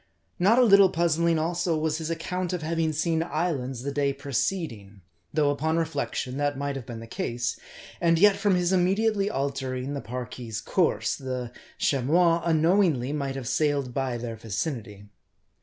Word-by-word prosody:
Not 200 Hz, +7 st, +4 dB
a 255 Hz, -, +6 dB
little 200 Hz, -4 st, +7 dB
puzzling, 170 Hz, -1 st, +2 dB
also, 170 Hz, +1 st, 0 dB
was 155 Hz, 0 st, -1 dB
his 160 Hz, 0 st, -4 dB
account 180 Hz, +2 st, -3 dB
of 175 Hz, -3 st, -3 dB
having 165 Hz, 0 st, 0 dB
seen 160 Hz, +1 st, 0 dB
islands 145 Hz, -7 st, -2 dB
the 140 Hz, -, -2 dB
day 140 Hz, 0 st, 0 dB
preceding; 135 Hz, -, -3 dB, 0.3 s
though, 145 Hz, -2 st, +2 dB
upon 160 Hz, +3 st, 0 dB
reflection, 140 Hz, -5 st, -2 dB
that 145 Hz, -1 st, 0 dB
might 140 Hz, 0 st, -2 dB
have 130 Hz, -4 st, -7 dB
been 115 Hz, -2 st, -7 dB
the -, -, -8 dB
case, 120 Hz, +1 st, -3 dB, 0.4 s
and 165 Hz, -1 st, +4 dB
yet, 200 Hz, +3 st, +6 dB
from 200 Hz, -1 st, +2 dB
his 180 Hz, +1 st, +1 dB
immediately 200 Hz, +3 st, +2 dB
altering 135 Hz, -3 st, -3 dB
the 140 Hz, -, -4 dB
Parki's 120 Hz, -2 st, -6 dB
course, 170 Hz, +8 st, +1 dB
the 130 Hz, -3 st, -5 dB, 0.3 s
Chamois, 165 Hz, +6 st, +2 dB
unknowingly 160 Hz, -5 st, +2 dB
might 140 Hz, -2 st, -2 dB
have 130 Hz, -3 st, -5 dB
sailed 140 Hz, -2 st, 0 dB
by 130 Hz, -2 st, -1 dB
their 115 Hz, -1 st, -5 dB
vicinity. 110 Hz, -, -4 dB
150 Hz, 160 wpm, -26 LUFS, 130-170 Hz, 0.4 s, little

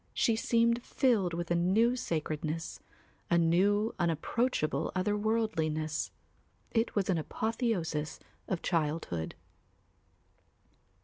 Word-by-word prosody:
She 230 Hz, -, +3 dB
seemed 235 Hz, +1 st, +2 dB
filled 210 Hz, -10 st, +1 dB
with 170 Hz, 0 st, -4 dB
a -, -, +4 dB
new 205 Hz, +8 st, +3 dB
sacredness, 160 Hz, -6 st, -3 dB, 0.5 s
a 170 Hz, -, +4 dB
new 195 Hz, +6 st, +3 dB
unapproachable 165 Hz, -, 0 dB
otherworldliness; 185 Hz, -6 st, 0 dB, 0.6 s
it 225 Hz, 0 st, 0 dB
was 200 Hz, -3 st, +1 dB
an 180 Hz, -4 st, +2 dB
apotheosis 170 Hz, -, -2 dB, 0.3 s
of 185 Hz, -, -2 dB
childhood. 150 Hz, -, -1 dB
180 Hz, 90 wpm, -31 LUFS, 160-225 Hz, 0.6 s, a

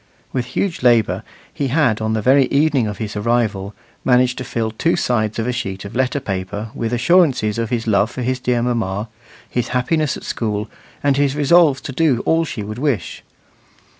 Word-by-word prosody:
With 125 Hz, -2 st, -1 dB
huge 180 Hz, +5 st, -2 dB
labour 120 Hz, -4 st, +3 dB, 0.3 s
he 140 Hz, -, -2 dB
had, 125 Hz, -6 st, +2 dB
on 110 Hz, 0 st, 0 dB
the 110 Hz, -1 st, -1 dB
very 135 Hz, +2 st, +5 dB
evening 140 Hz, -3 st, +2 dB
of 105 Hz, -, -5 dB
his 110 Hz, -2 st, -5 dB
arrival, 105 Hz, -3 st, 0 dB, 0.3 s
managed 125 Hz, -1 st, +3 dB
to -, -, -3 dB
fill 115 Hz, -3 st, -2 dB
two 165 Hz, +10 st, +1 dB
sides 110 Hz, -8 st, 0 dB
of 115 Hz, -, -1 dB
a 125 Hz, -, 0 dB
sheet 95 Hz, -6 st, -4 dB
of 100 Hz, -, -8 dB
letter 130 Hz, +2 st, +1 dB
paper 100 Hz, -2 st, -4 dB
with 115 Hz, 0 st, -3 dB
assurances 125 Hz, -, +3 dB
of 115 Hz, -1 st, -2 dB
his 115 Hz, -2 st, -1 dB
love 105 Hz, -1 st, +2 dB
for 125 Hz, 0 st, -5 dB
dear 125 Hz, -1 st, 0 dB
mamma, 110 Hz, -3 st, -1 dB, 0.4 s
his 120 Hz, -2 st, -2 dB
happiness 150 Hz, +3 st, 0 dB
at -, -, -12 dB
school, 105 Hz, -1 st, -2 dB, 0.4 s
and 140 Hz, -1 st, +2 dB
his 140 Hz, -1 st, +2 dB
resolves 150 Hz, -1 st, +4 dB
to -, -, -6 dB
do 135 Hz, -4 st, +1 dB
all 165 Hz, 0 st, +2 dB
she 115 Hz, -8 st, -5 dB
would 105 Hz, +3 st, -6 dB
wish. 130 Hz, -, -2 dB
120 Hz, 190 wpm, -19 LUFS, 110-135 Hz, 0.4 s, very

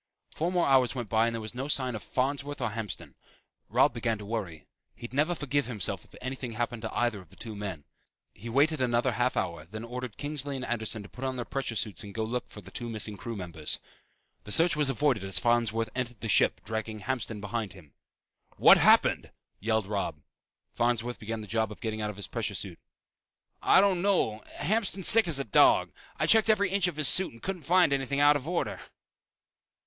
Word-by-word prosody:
Four 170 Hz, +3 st, -1 dB
more 180 Hz, -2 st, +2 dB
hours 130 Hz, -2 st, +3 dB
went 120 Hz, -5 st, -4 dB
by 110 Hz, +1 st, +3 dB
and 115 Hz, -, -2 dB
there 115 Hz, -, -4 dB
was 110 Hz, -, -6 dB
no 130 Hz, +3 st, -4 dB
sign 130 Hz, -4 st, 0 dB
of 110 Hz, -, -5 dB
Farnsworth 140 Hz, +2 st, -2 dB
or -, -, -1 dB
Hamston. 105 Hz, -3 st, -6 dB, 0.6 s
Robb -, -, +4 dB
began 115 Hz, -1 st, -1 dB
to 105 Hz, -, -9 dB
worry. 95 Hz, -8 st, -5 dB, 0.3 s
He'd 120 Hz, +1 st, -9 dB
never 155 Hz, +6 st, +2 dB
forgive 145 Hz, -2 st, -1 dB
himself 110 Hz, -8 st, -3 dB
if -, -, -19 dB
anything 130 Hz, -2 st, -5 dB
happened 120 Hz, +1 st, -3 dB
to 110 Hz, -, -5 dB
either 120 Hz, -4 st, +1 dB
of 90 Hz, -, -19 dB
the 95 Hz, -, -18 dB
two 110 Hz, 0 st, -7 dB
men. 95 Hz, -7 st, -5 dB, 0.5 s
He 115 Hz, +4 st, -9 dB
waited 145 Hz, +4 st, +2 dB
another 120 Hz, +1 st, +2 dB
half 120 Hz, +3 st, 0 dB
hour, 85 Hz, -4 st, -2 dB
then 110 Hz, +6 st, -8 dB
ordered 125 Hz, -2 st, -6 dB
Kinsley 145 Hz, -1 st, -3 dB
and 130 Hz, -1 st, -4 dB
Anderson 110 Hz, -2 st, -2 dB
to -, -, -11 dB
put 125 Hz, -, -10 dB
on 130 Hz, -1 st, -1 dB
their 120 Hz, -2 st, -4 dB
pressure 135 Hz, -4 st, -3 dB
suits 105 Hz, -5 st, -2 dB
and 100 Hz, -1 st, -10 dB
go 110 Hz, -, -1 dB
look 120 Hz, +3 st, -3 dB
for 105 Hz, -, -11 dB
the 95 Hz, 0 st, -14 dB
two 120 Hz, +4 st, -5 dB
missing 110 Hz, -1 st, -3 dB
crew 115 Hz, +4 st, -6 dB
members. 85 Hz, -6 st, -3 dB, 0.6 s
The 105 Hz, -, -9 dB
search 165 Hz, +7 st, +4 dB
was 150 Hz, -2 st, +1 dB
avoided 135 Hz, -5 st, +1 dB
as 95 Hz, -2 st, 0 dB
Farnsworth 115 Hz, -2 st, +1 dB
entered 120 Hz, -3 st, -4 dB
the 115 Hz, -, -3 dB
ship 100 Hz, -, +3 dB
dragging 110 Hz, 0 st, -4 dB
Hamston 115 Hz, -2 st, -3 dB
behind 105 Hz, 0 st, -4 dB
him. 80 Hz, -8 st, -16 dB, 0.6 s
"What -, -, +8 dB
happened!" -, -, +4 dB, 0.3 s
yelled 110 Hz, 0 st, 0 dB
Robb. 100 Hz, -7 st, -3 dB, 0.5 s
Farnsworth 120 Hz, 0 st, 0 dB
began 110 Hz, +1 st, -4 dB
the -, -, -7 dB
job 110 Hz, 0 st, 0 dB
of 105 Hz, -, -10 dB
getting 110 Hz, -1 st, -3 dB
out 105 Hz, -, -2 dB
of 105 Hz, -, -6 dB
his 100 Hz, -, -5 dB
pressure 110 Hz, -3 st, -3 dB
suit. 95 Hz, -3 st, -4 dB, 0.8 s
"I -, -, +6 dB
don't 190 Hz, -3 st, +3 dB
know. 175 Hz, -, +1 dB
Hamston's 195 Hz, +1 st, +1 dB
sick 225 Hz, -3 st, +7 dB
as 160 Hz, -4 st, +3 dB
a 140 Hz, -, 0 dB
dog. 110 Hz, -, +4 dB, 0.3 s
I -, -, +1 dB
checked 220 Hz, 0 st, +6 dB
every 205 Hz, -3 st, +3 dB
inch 195 Hz, -2 st, +3 dB
of 175 Hz, -, -3 dB
his 155 Hz, -2 st, +1 dB
suit 190 Hz, +1 st, +6 dB
and 115 Hz, -, -17 dB
couldn't 180 Hz, -7 st, -5 dB
find 180 Hz, -5 st, +5 dB
anything 140 Hz, 0 st, -1 dB
out 145 Hz, 0 st, +6 dB
of 145 Hz, 0 st, -3 dB
order." 175 Hz, -, -2 dB
120 Hz, 215 wpm, -29 LUFS, 110-140 Hz, 0.8 s, What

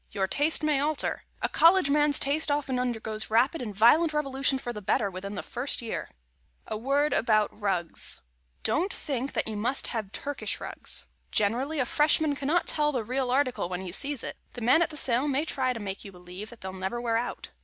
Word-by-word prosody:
Your 195 Hz, -2 st, -1 dB
taste 295 Hz, +10 st, +1 dB
may 300 Hz, -2 st, +3 dB
alter. 295 Hz, +1 st, 0 dB, 0.2 s
A -, -, +4 dB
College 335 Hz, -3 st, +5 dB
man's 295 Hz, -1 st, +5 dB
taste 295 Hz, +3 st, +1 dB
often 285 Hz, -3 st, 0 dB
undergoes 225 Hz, -3 st, -1 dB
rapid 250 Hz, +8 st, +2 dB
and 225 Hz, -4 st, -4 dB
violent 305 Hz, -, +5 dB
revolution 275 Hz, -2 st, 0 dB
for 245 Hz, -2 st, -5 dB
the 210 Hz, -, -7 dB
better, 200 Hz, +1 st, +1 dB
within 200 Hz, +2 st, -6 dB
the -, -, -4 dB
first 250 Hz, +4 st, -1 dB
year. 230 Hz, -2 st, -4 dB, 0.5 s
[Sidenote: -, -, -38 dB
A 215 Hz, -, -1 dB
WORD 280 Hz, +6 st, +1 dB
ABOUT 215 Hz, -2 st, +2 dB
RUGS] 185 Hz, -5 st, -1 dB, 0.4 s
Don't 370 Hz, +5 st, +1 dB
think 270 Hz, -2 st, -3 dB
that -, -, -1 dB
you 220 Hz, -, -4 dB
must 235 Hz, +6 st, -1 dB
have 215 Hz, -4 st, -3 dB
Turkish 285 Hz, +4 st, -3 dB
rugs. -, -, -3 dB, 0.3 s
Generally, 255 Hz, +9 st, +1 dB
a -, -, +1 dB
Freshman 300 Hz, +2 st, +3 dB
cannot 295 Hz, +5 st, +1 dB
tell 300 Hz, -1 st, +2 dB
the 250 Hz, -5 st, -1 dB
real 255 Hz, +3 st, -1 dB
article 255 Hz, -8 st, +1 dB
when 180 Hz, 0 st, -3 dB
he 185 Hz, -2 st, -6 dB
sees 280 Hz, +7 st, -2 dB
it. -, -, -6 dB, 0.2 s
The 245 Hz, -, -7 dB
man 250 Hz, +8 st, +5 dB
at 340 Hz, -, +2 dB
the 305 Hz, -, -8 dB
sale 255 Hz, 0 st, +1 dB
may 285 Hz, +2 st, +1 dB
try 260 Hz, -4 st, 0 dB
to 240 Hz, -, -4 dB
make 195 Hz, -2 st, -5 dB
you 200 Hz, -, -9 dB
believe 180 Hz, +4 st, -9 dB
they'll 190 Hz, 0 st, -6 dB
never 190 Hz, +5 st, -3 dB
wear 235 Hz, -1 st, 0 dB
out. 240 Hz, +1 st, -4 dB
255 Hz, 210 wpm, -28 LUFS, 215-290 Hz, 0.5 s, College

